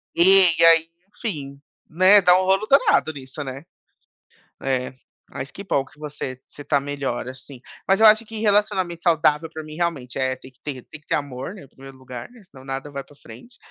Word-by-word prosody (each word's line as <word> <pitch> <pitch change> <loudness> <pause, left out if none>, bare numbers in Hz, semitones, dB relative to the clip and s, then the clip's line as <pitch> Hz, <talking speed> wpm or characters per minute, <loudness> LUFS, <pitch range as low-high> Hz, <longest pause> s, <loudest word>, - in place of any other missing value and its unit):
"E" 185 0 +7
e - - +6
aí" 165 0 +5 0.3
Enfim, 140 -10 -6 0.3
né, 185 +5 +6
dá 180 0 +5
um 185 - -2
rolo 195 +3 +2
danado 215 - +3
nisso, 135 +1 -8
né. 135 +2 -8 1.0
É, 130 -1 -2 0.4
mas 130 +1 -7
que 200 - -9
bom 140 -8 -1
que 150 - -22
você 140 -4 -7
você 145 - -11
tá 145 0 +1
melhor, 140 -3 -4
assim. 130 0 -12 0.3
Mas 195 +2 +3
eu 220 - +6
acho 215 +2 +5
que 220 0 -8
relacionamento 200 -5 0
saudável, 160 -2 +2
para 160 -1 -8
mim, 155 0 -10
realmente, 155 -8 -3
eh, 130 -1 0
tem 130 0 -15
que 125 - -38
ter 135 -4 -6
tem 155 - -12
que - - -40
ter - - +1
amor, 140 +3 -5
né, 165 -9 -13
primeiro 135 +1 -14
lugar, 130 - -9
né, 245 - -17
senão 135 -7 -17
nada 135 +2 -5
vai 140 -1 -6
para 145 - -21
a - - -25
frente. 245 0 -14
150 Hz, 210 wpm, -22 LUFS, 135-185 Hz, 1.0 s, E